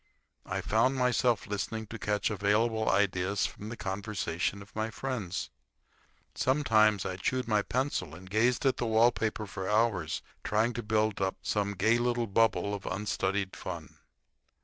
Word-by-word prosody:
I - - -2
found 115 +5 +2
myself 125 -2 +2
listening 105 +1 -3
to 115 +1 -8
catch 105 +2 0
available 110 +2 +1
ideas 100 0 +2
from 105 - -6
the 115 - -6
conversation 100 -1 -2
of 100 - -21
my 110 +1 -1
friends. 115 -8 -4 0.8
Sometimes 110 -7 +3
I 95 - -3
chewed 130 +6 -1
my 105 -2 +3
pencil 115 - -2
and 95 +1 -12
gazed 115 +7 +2
at 135 - +3
the 120 - -1
wall 115 +2 +5
paper 110 -1 -2
for 95 -1 -5
hours 105 -7 +1 0.2
trying 110 +3 +1
to 120 - -3
build 110 -1 0
up 95 0 0
some 100 0 0
gay 110 +5 +3
little 120 -1 +1
bubble 105 -1 +2
of 100 - -5
unstudied 95 0 -1
fun. - - -7
105 Hz, 155 wpm, -30 LUFS, 100-115 Hz, 0.8 s, wall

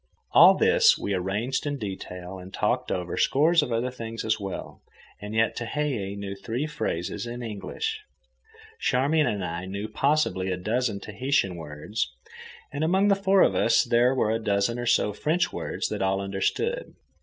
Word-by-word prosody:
All - - +8
this - - +5
we 100 - -3
arranged 105 +10 -1
in 145 0 -2
detail, 95 -4 -6
and 90 +1 -10
talked - - -1
over 90 -1 -3
scores 160 +4 +4
of 125 - -3
other 115 +2 0
things 115 -2 -6
as 110 0 +1
well, 100 -2 -6 0.4
and 105 +1 -6
yet 110 0 +2
Tehei 120 -6 -2
knew 100 -1 -5
three 115 +8 -3
phrases 110 - -3
in 120 +1 -6
English, 430 - -4 0.8
Charmian 145 +4 +2
and 100 -3 -1
I 85 +2 -4
knew 100 +3 -4
possibly 110 -6 +1
a 90 - -1
dozen 110 +2 -1
Tahitian 110 -3 0
words, 80 +7 -4 0.6
and 145 +2 -2
among 190 +5 +3
the 200 - +5
four 195 0 +4
of - - +3
us 115 0 +3
there 120 +2 +3
were 110 -4 +1
a 115 - 0
dozen 100 +4 +1
or 120 - -3
so 105 -2 +3
French 160 - 0
words - - -3
that - - -3
all 95 0 +1
understood. 100 - -2
115 Hz, 170 wpm, -26 LUFS, 100-140 Hz, 0.8 s, All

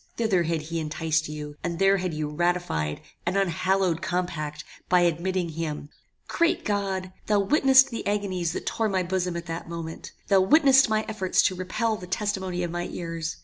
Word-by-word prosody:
Thither 220 -6 +2
had 165 -2 -1
he 165 +2 -3
enticed 160 0 -1
you, 150 -1 -7
and 170 -1 -2
there 195 +2 +4
had 180 -1 -2
you 155 -1 -3
ratified 150 - -1 0.3
an 185 +3 +1
unhallowed 185 -1 +1
compact 155 -4 -3 0.3
by 180 -1 +5
admitting 175 +1 0
him 155 -2 -4 0.4
"Great 335 0 +1
God! 195 -3 -2
Thou 210 -1 +3
witnessedst 265 +2 +5
the 230 - -4
agonies 185 -5 -1
that - - -5
tore 225 -1 0
my 190 -2 0
bosom 180 -1 -1
at 170 - -6
that 165 0 -6
moment! 165 -1 -6 0.2
Thou 195 -2 +5
witnessedst 270 +1 +6
my 215 0 +1
efforts 200 -4 +1
to 185 - +2
repel 215 +5 -1
the 180 - -9
testimony 190 -2 -2
of 175 - -3
my 175 0 -3
ears! 165 -1 -4
180 Hz, 180 wpm, -26 LUFS, 165-195 Hz, 0.4 s, witnessedst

